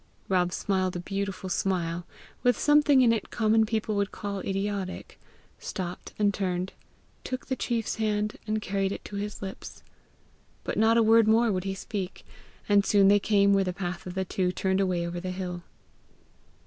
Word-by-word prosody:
Rob 180 -2 +2
smiled 185 -1 -1
a - - -2
beautiful 195 +1 -4
smile 175 -2 -1 0.3
with 245 -2 +3
something 295 -2 +5
in 235 -2 +5
it 225 - -3
common 220 0 +2
people 220 -1 -1
would 200 0 0
call 200 -1 -4
idiotic 195 -1 -4 0.4
stopped 180 -1 -5
and 205 -1 +2
turned, 185 -1 -2 0.5
took 255 0 -4
the 260 - -2
chief's 230 -4 -2
hand, 210 -1 -1
and 215 0 -1
carried 195 0 -1
it - - -6
to 205 - -6
his 205 0 -5
lips; 190 0 -8 0.8
but - - -3
not 225 +1 +4
a 230 - +5
word 225 0 +5
more 225 +1 +4
would 185 -1 -2
he 195 0 -2
speak, 195 -1 -5 0.4
and 205 -1 +5
soon 200 -1 +5
they 205 0 +6
came 200 -1 +3
where 195 0 +4
the 180 -1 -2
path 180 -1 -5
of 180 - -6
the 190 0 -1
two 180 0 0
turned 190 +1 0
away 180 -3 0
over 175 0 -4
the 185 +1 -5
hill. 180 -1 -4
200 Hz, 180 wpm, -27 LUFS, 185-215 Hz, 0.8 s, they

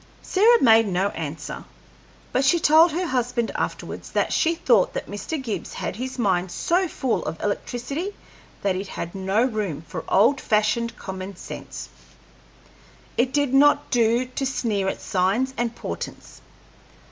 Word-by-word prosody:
Sarah 460 +5 +4
made 225 -2 +6
no 190 +1 +1
answer, 155 -3 -6 0.7
but 260 - +1
she 300 +6 +4
told 320 +2 +6
her 355 +4 -1
husband 245 -5 -1
afterwards - - -4
that - - +1
she 330 +1 +2
thought 240 - +3
that - - -3
Mr. 205 - -4
Gibbs 215 -10 -4
had - - -4
his 260 +4 -5
mind 190 -5 +1
so 355 - +1
full 250 - -1
of 160 +1 -5
electricity 270 - -3 0.5
that 195 -2 +1
it 195 +2 -4
had 170 -2 -6
no 195 +4 +1
room 210 - -2
for - - -6
old 230 +8 +4
fashioned 220 +2 +1
common 190 0 -6
sense. - - -8 1.3
It 250 +2 +1
did 285 -2 +1
not 290 +2 +4
do 235 0 +3
to 255 +2 -5
sneer 220 -7 -1
at - - -3
signs 200 +8 +1
and 235 -1 -2
portents. 85 -7 -7
230 Hz, 150 wpm, -24 LUFS, 195-270 Hz, 1.3 s, made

